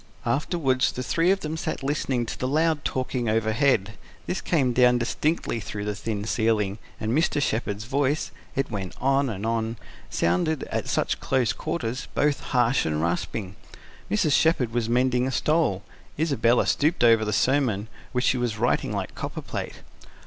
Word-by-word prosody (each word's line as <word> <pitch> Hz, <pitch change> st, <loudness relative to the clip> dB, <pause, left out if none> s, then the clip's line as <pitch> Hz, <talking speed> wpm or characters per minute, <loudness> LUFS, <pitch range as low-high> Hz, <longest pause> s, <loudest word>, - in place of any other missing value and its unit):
Afterwards 135 Hz, 0 st, +1 dB
the 125 Hz, -, -4 dB
three 165 Hz, +7 st, +1 dB
of 195 Hz, +1 st, +2 dB
them 155 Hz, +1 st, -3 dB
sat 160 Hz, -, -3 dB
listening 135 Hz, -3 st, 0 dB
to -, -, -5 dB
the 130 Hz, -, -1 dB
loud 155 Hz, +1 st, +1 dB
talking 125 Hz, -2 st, -1 dB
overhead. 110 Hz, 0 st, +2 dB, 0.3 s
This 180 Hz, -, -2 dB
came 135 Hz, -7 st, +1 dB
down 125 Hz, 0 st, +5 dB
distinctly 125 Hz, +2 st, -1 dB
through 105 Hz, -1 st, -5 dB
the 105 Hz, -, -1 dB
thin 105 Hz, 0 st, -4 dB
ceiling, 110 Hz, -3 st, 0 dB, 0.2 s
and 110 Hz, 0 st, -2 dB
Mr. 155 Hz, +3 st, +2 dB
Shepherd's 110 Hz, -5 st, -1 dB
voice 140 Hz, +4 st, 0 dB, 0.2 s
it 135 Hz, -2 st, -1 dB
went 95 Hz, -4 st, -4 dB
on 135 Hz, +1 st, +2 dB
and 105 Hz, -1 st, -4 dB
on 115 Hz, 0 st, -1 dB, 0.3 s
sounded, 90 Hz, -, +1 dB
at -, -, -2 dB
such -, -, 0 dB
close 130 Hz, -4 st, +1 dB
quarters, 135 Hz, -5 st, -3 dB
both 145 Hz, -1 st, +2 dB
harsh 125 Hz, 0 st, +2 dB
and 75 Hz, -1 st, -1 dB
rasping. 90 Hz, +4 st, -2 dB, 0.5 s
Mrs. 105 Hz, +9 st, +2 dB
Shepherd 135 Hz, -9 st, +3 dB
was 120 Hz, -2 st, 0 dB
mending 125 Hz, +1 st, +2 dB
a -, -, -1 dB
stole; 150 Hz, -, +1 dB, 0.3 s
Isabella 140 Hz, -6 st, +2 dB
stooped 155 Hz, -1 st, +1 dB
over 115 Hz, -2 st, +6 dB
the 105 Hz, -, -1 dB
sermon, 115 Hz, -3 st, +1 dB, 0.2 s
which 125 Hz, 0 st, 0 dB
she 130 Hz, -, +3 dB
was 120 Hz, -3 st, -1 dB
writing 120 Hz, +3 st, +1 dB
like -, -, -3 dB
copperplate. -, -, -6 dB
125 Hz, 165 wpm, -25 LUFS, 110-140 Hz, 0.5 s, over